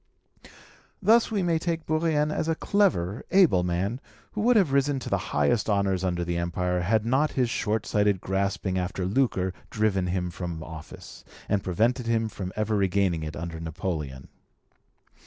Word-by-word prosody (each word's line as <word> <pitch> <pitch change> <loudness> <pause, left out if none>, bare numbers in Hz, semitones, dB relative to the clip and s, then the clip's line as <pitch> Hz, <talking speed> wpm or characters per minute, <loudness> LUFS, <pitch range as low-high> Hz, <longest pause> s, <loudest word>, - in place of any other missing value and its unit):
Thus 230 +1 +4
we 205 -4 0
may 170 -2 +1
take 165 -1 -2
Bourrienne 155 -1 +1
as 160 - -1
a 165 - +1
clever, 140 - +1
able 180 - +5
man, 90 +8 -1 0.3
who 210 - -3
would 240 +3 +4
have 190 -10 +4
risen 140 0 +2
to 130 - -6
the - - +2
highest 75 +11 +1
honours 100 -2 +1
under 90 -2 -1
the 85 0 -2
Empire 90 +1 -1
had 105 +5 +1
not 135 +6 +2
his 125 -3 +1
short 110 -1 -1
sighted 105 -2 +2
grasping 95 0 -1
after 90 0 -3
lucre 95 -4 +1 0.2
driven 100 -4 0
him 90 -1 -1
from 85 -2 -5
office, 80 -2 -10 0.2
and 100 -1 0
prevented 115 +7 +1
him 115 -1 +1
from 95 -3 -6
ever 110 0 0
regaining 95 -3 +1
it 80 0 -5
under 85 0 -5
Napoleon. 80 -5 -4
100 Hz, 165 wpm, -26 LUFS, 90-135 Hz, 0.3 s, able